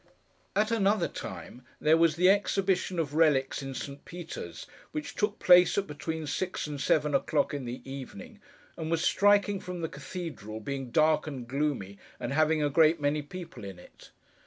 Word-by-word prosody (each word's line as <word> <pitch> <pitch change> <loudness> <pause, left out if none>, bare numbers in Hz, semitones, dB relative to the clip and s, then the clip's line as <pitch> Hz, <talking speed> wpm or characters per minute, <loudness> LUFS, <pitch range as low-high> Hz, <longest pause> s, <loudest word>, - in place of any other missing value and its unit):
At 215 +2 +2
another 205 -4 +2
time, 95 +7 -8 0.2
there 155 +1 +4
was 165 -2 +3
the 180 +2 +4
Exhibition 195 -2 +2
of 150 -3 -1
Relics 145 -5 +2
in 135 -1 -6
St. 140 +2 -6
Peter's, 175 -1 -8 0.3
which 305 -2 -4
took 210 -1 -1
place 180 +1 +6
at 200 - +1
between 160 +1 -5
six 180 +6 -2
and 145 -2 -5
seven 150 0 +2
o'clock 145 +2 +1
in 140 -3 -4
the 120 +2 -7
evening, 135 -1 -8 0.4
and 160 -1 -5
was 165 0 +1
striking 205 0 +3
from 180 -1 -6
the 160 - -1
cathedral 140 - -7
being 135 +2 -5
dark 155 +3 +3
and 130 -5 -6
gloomy, 130 -8 -2 0.2
and 125 - -3
having 155 0 +3
a 145 - +2
great 160 +2 +4
many 145 +1 0
people 165 - -9
in 95 -2 -7
it. 90 - -16
155 Hz, 175 wpm, -29 LUFS, 140-180 Hz, 0.4 s, place